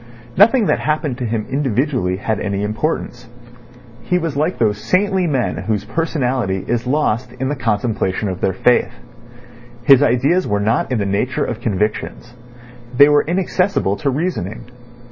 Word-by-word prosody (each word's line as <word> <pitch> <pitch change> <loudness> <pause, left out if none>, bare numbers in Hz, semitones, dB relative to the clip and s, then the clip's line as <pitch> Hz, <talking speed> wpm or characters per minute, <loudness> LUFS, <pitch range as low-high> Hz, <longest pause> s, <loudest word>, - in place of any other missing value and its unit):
Nothing 225 +4 +5
that - - +1
happened 150 -4 -2
to 125 - -2
him 110 -1 -2
individually 130 -7 0
had 110 +1 -2
any 100 0 -2
importance. 120 +2 -3 0.7
He 180 - 0
was 165 -4 -3
like 155 +5 0
those 105 -3 +1
saintly 190 - +1
men 135 -6 -1
whose 105 -2 -2
personality 125 - -1
is 120 +1 -1
lost 125 -4 0
in 130 +1 -3
the 145 - -1
contemplation 110 -4 -1
of 90 -1 -4
their 95 - +1
faith. 120 +6 +2 0.9
His 135 +1 +6
ideas 145 +7 +2
were 105 - 0
not 110 +5 0
in 125 - +1
the 100 - -1
nature 100 +6 -1
of 120 -1 -5
convictions. 110 +2 -3 0.6
They 145 +2 +8
were 145 0 +5
inaccessible 180 - 0
to 145 - -1
reasoning. 130 - -3
125 Hz, 155 wpm, -18 LUFS, 105-150 Hz, 0.9 s, They